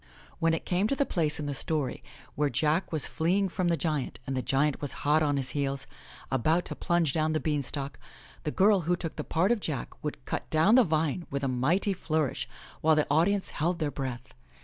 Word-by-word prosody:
When 165 0 +3
it - - -6
came 185 +3 +1
to 275 - 0
the 280 - +1
place 155 - 0
in 150 - -3
the 145 - -2
story 145 -1 -1 0.3
where 145 +1 +1
Jack 155 +8 +1
was 155 -3 +1
fleeing 185 +4 +1
from 180 0 -1
the 170 -1 +2
giant 155 -6 -2
and 135 - -3
the 130 - 0
giant 135 +3 +1
was 145 - 0
hot 150 +2 +4
on 145 -2 +2
his 135 -2 -2
heels, 140 -2 -2 0.5
about 155 +7 +2
to - - -6
plunge 170 -5 +1
down 155 0 +1
the 155 - +1
beanstalk, 140 -3 -2 0.4
the - - -1
girl 195 +5 +4
who 180 - +4
took 170 -2 -5
the 150 - -4
part 180 +9 +1
of 240 - +2
Jack 150 - -4
would 150 - -5
cut - - -4
down 160 +7 +4
the 255 0 +7
vine 160 -1 0
with 140 0 -3
a - - +1
mighty 155 - +2
flourish 155 -6 -1 0.3
while 160 0 +5
the 150 - +2
audience 190 +6 +2
held 170 +3 0
their 155 -4 -1
breath. 125 -3 -5
155 Hz, 215 wpm, -29 LUFS, 140-175 Hz, 0.5 s, the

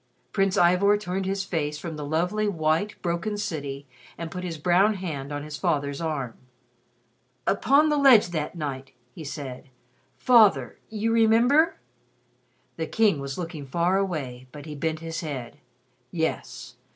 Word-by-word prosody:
Prince 195 -1 +1
Ivor 180 +4 +4
turned 190 -1 -3
his 195 0 -1
face 150 -5 -2
from 160 +1 -6
the 150 - -6
lovely, 180 +8 0
white, 165 +2 0
broken 180 +5 -1
city, 145 -8 -4 0.3
and 165 -1 -6
put 180 0 -5
his 170 -3 -4
brown 180 +7 +3
hand 150 -7 -5
on 145 0 -4
his 150 -1 -6
father's 145 -4 -1
arm. 145 -7 -2 1.1
"Upon 280 +9 +4
the 300 - +2
ledge 250 -9 +7
that 155 -1 -3
night 135 -4 -5
" 125 0 -40
he 160 - -9
said, 135 -3 -7 0.5
"Father, 205 - +4
you 220 +1 -1
remember 230 +8 +4 0.5
?" 125 +1 -41
The 160 -1 -2
King 210 -7 +2
was 140 -1 -5
looking 165 -5 -6
far 175 +6 +1
away, 135 -10 -3
but 145 -1 -10
he 155 - -7
bent 155 +2 -2
his 165 +1 -4
head: 135 -7 -6 0.5
"Yes. 160 +3 -4
165 Hz, 155 wpm, -26 LUFS, 145-195 Hz, 1.1 s, ledge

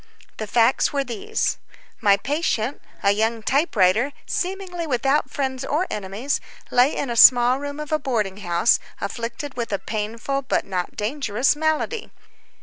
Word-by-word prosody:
The 215 - -4
facts 235 +4 +3
were 280 -1 0
these: 235 -5 -2 0.4
My 200 -1 +5
patient, 275 -1 -1 0.2
a 200 - +5
young 220 +2 0
typewriter, 245 - +2
seemingly 360 -2 -3
without 270 +2 +1
friends 265 -2 -3
or 305 +6 0
enemies, 210 +7 -2 0.3
lay 250 +4 +4
in 275 - -2
a - - -2
small 245 +2 +7
room 285 +1 -5
of 300 +1 -6
a 310 - +2
boarding 215 -8 -1
house, 175 +2 +2 0.2
afflicted 235 +7 -5
with 235 -3 -4
a 200 - +1
painful 225 +7 -3
but 265 - -1
not 180 -2 -3
dangerous 245 +2 0
malady. 315 +9 -1
250 Hz, 145 wpm, -23 LUFS, 215-285 Hz, 0.4 s, small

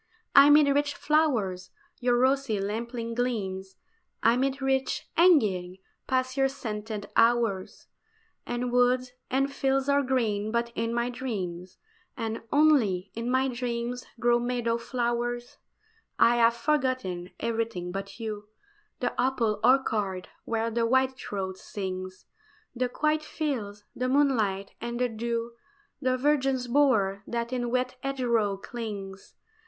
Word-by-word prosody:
Amid 290 +1 +8
rich 285 +1 +1
flowers 235 -13 +1 0.3
your 245 -1 +2
rosy 260 -4 +2
lamplight 230 +3 -3
gleams, 195 -6 -2 0.5
Amid 265 +4 +2
rich 270 -1 0
hangings 205 - +3 0.3
pass 255 0 0
your 270 -1 +3
scented 215 -5 -5
hours, 230 -5 +2 0.6
And 240 0 -3
woods 250 +1 +2 0.2
and 275 +2 +1
fields 270 0 +1
are 280 0 +4
green 220 -6 0
but 235 0 0
in 230 0 -2
my 235 +1 0
dreams, 185 -8 -5 0.4
And 225 -2 -3
only 250 -12 +3
in 230 +2 -3
my 260 +1 +2
dreams 245 -1 -3
grow 240 0 +3
meadow 240 -1 -1
flowers. 240 0 -2 0.6
I 240 +1 +5
have 230 0 +4
forgotten 245 - -1
everything 225 -6 -2
but 195 +2 -6
you 210 -2 -5 0.5
The - - 0
apple 240 -5 +1
orchard 215 -7 +2 0.2
where 230 0 -1
the 230 0 +1
whitethroat 230 -7 -1
sings, 185 -2 -6 0.5
The 250 0 0
quiet 305 +4 +1
fields, 235 -11 -4
the 255 0 -1
moonlight, 225 -9 +1
and 235 +1 -4
the 250 0 +1
dew, 230 +1 -3 0.5
The 255 -1 +1
virgin's 265 -2 +1
bower 225 -8 +3
that 235 +1 -3
in 245 -1 -1
wet 255 +1 -1
hedgerow 235 -7 0
clings. 200 -3 -7
240 Hz, 125 wpm, -27 LUFS, 210-260 Hz, 0.6 s, Amid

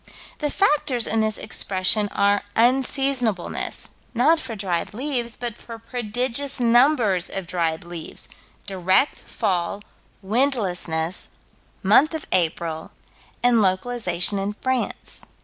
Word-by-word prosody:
The 295 - -1
factors 295 - +1
in 225 0 +1
this 215 -1 +1
expression 205 0 +1
are 200 0 +2
unseasonableness, 250 -4 +1 0.2
not 305 +8 +4
for 245 -6 -6
dried 190 -1 -3
leaves, 245 -2 -2
but 240 -3 -3
for 230 -1 -10
prodigious 245 +4 -2
numbers 240 - +3
of 195 -2 -3
dried 165 -2 -2
leaves; 170 -2 -2 0.4
direct 190 +6 +2
fall, 185 +2 -2 0.4
windlessness, 190 - 0 0.6
month 270 - +5
of 315 - -5
April, 165 -2 -1 0.5
and 240 -2 +4
localization 190 -1 0
in 200 +1 -2
France. 260 +3 -3
220 Hz, 110 wpm, -23 LUFS, 185-250 Hz, 0.6 s, month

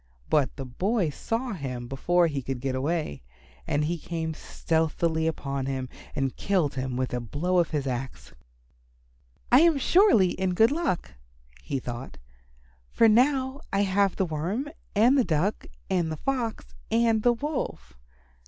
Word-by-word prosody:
But 140 -5 +2
the 135 - -6
boy 180 - 0
saw 230 - -3
him 125 -8 -5
before 175 +7 +2
he 145 -4 -1
could 130 0 -4
get 135 +1 -2
away, 135 - -2 0.5
and 150 +1 +1
he 170 +2 -2
came 160 0 -3
stealthily 160 +1 -1
upon 140 -4 -3
him 130 -2 -3 0.3
and 135 -2 -1
killed 180 -8 0
him 130 -1 -3
with 130 -1 -2
a 125 - 0
blow 160 +10 0
of 170 - +2
his 145 -3 -2
axe. 130 0 -5 1.2
"I 250 - +8
am 335 -3 +5
surely 310 - +5
in 185 -1 -1
good 225 +6 +5
luck," 315 - -1 0.5
he 140 - -3
thought, 125 +1 -7 0.7
"for 230 - +4
now 260 +4 +3
I 200 -1 +2
have 195 0 +2
the 190 - +1
Worm 180 - -2 0.3
and 245 +7 +5
the - - +4
Duck 175 +3 0 0.2
and 170 -3 0
the 155 - -4
Fox 245 - -3 0.2
and 225 -1 +3
the 240 +2 +4
Wolf." 280 - -4
170 Hz, 155 wpm, -27 LUFS, 135-225 Hz, 1.2 s, I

